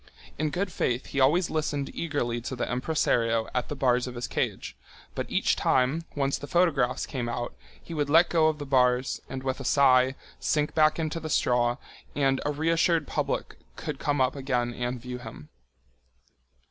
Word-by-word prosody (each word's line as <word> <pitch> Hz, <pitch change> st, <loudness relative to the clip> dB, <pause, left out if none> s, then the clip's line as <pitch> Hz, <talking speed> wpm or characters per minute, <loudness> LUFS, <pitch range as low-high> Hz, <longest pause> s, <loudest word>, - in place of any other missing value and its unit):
In 155 Hz, 0 st, +1 dB
good 185 Hz, +4 st, -2 dB
faith 125 Hz, -5 st, -1 dB
he 140 Hz, -, -3 dB
always 160 Hz, +7 st, +3 dB
listened 150 Hz, -3 st, -2 dB
eagerly 120 Hz, -8 st, -2 dB
to 130 Hz, -, -5 dB
the 125 Hz, -, -2 dB
impresario 120 Hz, -4 st, +1 dB
at 125 Hz, -1 st, -1 dB
the 145 Hz, -, -3 dB
bars 125 Hz, -2 st, +2 dB
of 125 Hz, -, -7 dB
his 120 Hz, 0 st, -3 dB
cage, -, -, -3 dB, 0.4 s
but -, -, -4 dB
each -, -, +2 dB
time, 135 Hz, +6 st, +1 dB
once 140 Hz, -1 st, 0 dB
the 145 Hz, -, -7 dB
photographs 160 Hz, -8 st, +2 dB
came 125 Hz, -5 st, -4 dB
out, 120 Hz, 0 st, -3 dB, 0.3 s
he 170 Hz, -, -10 dB
would 145 Hz, -2 st, -1 dB
let 165 Hz, +3 st, +6 dB
go 160 Hz, -2 st, +3 dB
of 155 Hz, -1 st, 0 dB
the 145 Hz, -, -6 dB
bars 125 Hz, -1 st, +2 dB
and, 130 Hz, 0 st, -5 dB
with 130 Hz, 0 st, -2 dB
a -, -, -5 dB
sigh, 130 Hz, -1 st, +4 dB, 0.2 s
sink 150 Hz, -1 st, 0 dB
back 155 Hz, -1 st, +4 dB
into 160 Hz, 0 st, -2 dB
the 160 Hz, -1 st, -6 dB
straw, 120 Hz, -3 st, +2 dB, 0.4 s
and 135 Hz, -2 st, +2 dB
a -, -, +1 dB
reassured 165 Hz, +1 st, +2 dB
public -, -, -3 dB, 0.2 s
could -, -, -5 dB
come 145 Hz, -1 st, 0 dB
up 130 Hz, +1 st, +2 dB
again 125 Hz, -3 st, -1 dB
and 125 Hz, +1 st, -3 dB
view 125 Hz, +1 st, -6 dB
him. 110 Hz, -11 st, -10 dB
135 Hz, 185 wpm, -27 LUFS, 125-155 Hz, 0.4 s, let